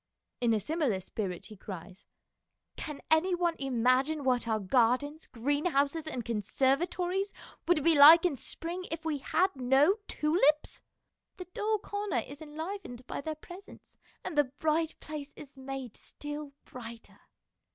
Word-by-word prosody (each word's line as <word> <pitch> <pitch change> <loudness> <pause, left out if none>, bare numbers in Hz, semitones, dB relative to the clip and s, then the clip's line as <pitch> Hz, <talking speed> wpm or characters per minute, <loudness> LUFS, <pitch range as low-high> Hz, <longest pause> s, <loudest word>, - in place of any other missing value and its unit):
In 240 -2 +2
a - - +1
similar 275 - 0
spirit 185 -2 -5
he 215 - -11
cries, 190 -1 -10 0.4
" - - -56 0.3
Can 300 -3 -6
any 350 +4 +4
one 345 -1 +1
imagine 265 +3 +2
what 250 -3 +1
our 220 -1 +1
gardens, 255 - +1
greenhouses, 285 +4 0
and 250 -7 -4
conservatories 345 - 0 0.3
would 340 -4 +3
be 335 - +5
like 315 +4 +10
in 340 -5 +2
spring 340 +8 -5
if 325 0 -5
we 305 -3 -1
had 365 +7 +1
no 270 - +4
tulips?... 300 -1 +2 0.6
The 365 - -7
dull 430 +1 0
corner 410 -5 -3
is 285 +3 -10
enlivened 315 -4 -7
by - - -5
their 310 +2 -4
presence, 355 +5 -13 0.2
and 320 - -5
the 295 -1 +4
bright 310 +4 -1
place 295 -2 -7
is 280 -1 -12
made 265 -3 -7
still 295 -1 -7
brighter." 235 -2 -10
290 Hz, 145 wpm, -30 LUFS, 255-330 Hz, 0.6 s, like